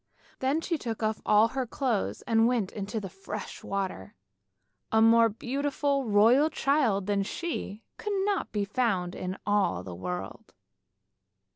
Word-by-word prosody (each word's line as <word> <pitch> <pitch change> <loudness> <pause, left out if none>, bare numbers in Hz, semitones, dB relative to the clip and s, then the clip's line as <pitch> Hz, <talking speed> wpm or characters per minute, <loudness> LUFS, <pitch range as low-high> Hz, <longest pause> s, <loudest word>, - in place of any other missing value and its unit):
Then 275 +5 +1
she 330 -2 -2
took 225 -3 -4
off 215 0 -1
all 215 +2 +5
her 260 +1 -2
clothes 240 -4 -1
and 225 0 +3
went 235 -6 0
into 205 +1 -4
the 200 - -6
fresh 195 +3 -7
water. 190 - -4 0.8
A 220 - +4
more 230 +1 +6
beautiful 275 +4 -1
royal 230 +8 +5
child 265 -11 +1
than 200 0 +1
she 225 - -4
could 420 -2 -3
not 405 -3 -1
be 205 -1 -1
found 200 -5 0
in 185 0 -4
all 200 - +1
the 90 - -7
world. 90 +2 -6
220 Hz, 145 wpm, -28 LUFS, 195-260 Hz, 0.8 s, more